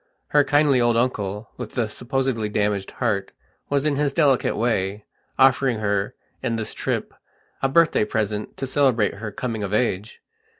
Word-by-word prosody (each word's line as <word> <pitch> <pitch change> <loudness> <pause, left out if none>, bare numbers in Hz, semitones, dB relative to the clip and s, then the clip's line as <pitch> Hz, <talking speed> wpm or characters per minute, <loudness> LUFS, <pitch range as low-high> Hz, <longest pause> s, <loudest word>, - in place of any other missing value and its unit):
Her 145 0 +5
kindly 145 -3 +3
old 120 -1 +3
uncle, 105 -3 -1
with 120 -3 -7
the 120 -3 0
supposedly 125 -1 -2
damaged 105 -2 0
heart, 100 -2 -2 0.4
was 140 0 +1
in 145 -2 +1
his 145 -1 +1
delicate 140 -4 +2
way, 105 -3 -1 0.3
offering 130 -2 +4
her, 100 -1 -1 0.3
in 120 -3 -1
this 110 -1 -4
trip, - - -3 0.5
a 135 - +2
birthday 160 -6 +4
present 105 -1 -2
to 135 - -3
celebrate 130 -6 +2
her 105 +1 -6
coming 115 +1 -4
of 100 0 -1
age. 105 -2 -1
115 Hz, 160 wpm, -23 LUFS, 105-135 Hz, 0.5 s, Her